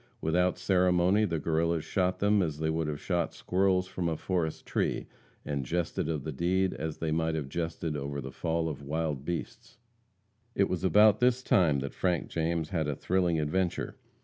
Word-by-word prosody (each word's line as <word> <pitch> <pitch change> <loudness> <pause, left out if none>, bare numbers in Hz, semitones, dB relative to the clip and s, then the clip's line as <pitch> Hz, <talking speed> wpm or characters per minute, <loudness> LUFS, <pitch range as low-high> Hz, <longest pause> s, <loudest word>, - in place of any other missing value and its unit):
Without 90 +1 +1
ceremony 90 +2 +3
the 85 -4 -1
Guerrillas 80 +1 0
shot 90 -2 0
them 105 0 +3
as 80 -5 -1
they 80 0 0
would 80 -1 -1
have 75 -1 -3
shot 90 -2 -1
squirrels 95 0 +1
from 90 -2 -2
a 80 - -2
forest 85 -4 -2
tree, - - -1 0.4
and 70 -2 -2
jested 80 +2 -2
of 75 -4 -2
the 80 - -4
deed 90 +5 +1
as 80 -1 -4
they 80 -1 -2
might 80 0 0
have 75 -4 -3
jested 80 +1 -3
over 70 0 -3
the 65 0 -6
fall 80 +2 -1
of 75 -3 -5
wild 75 -1 -2
beasts. 115 +7 -5 0.8
It 100 - +3
was 90 -1 -3
about 105 +2 +6
this 125 0 +3
time 75 - +3
that 70 - -5
Frank 90 -3 0
James 80 -1 -1
had 80 -4 -1
a 75 - -1
thrilling 90 -1 +1
adventure. 85 +4 -1
85 Hz, 185 wpm, -29 LUFS, 80-90 Hz, 0.8 s, about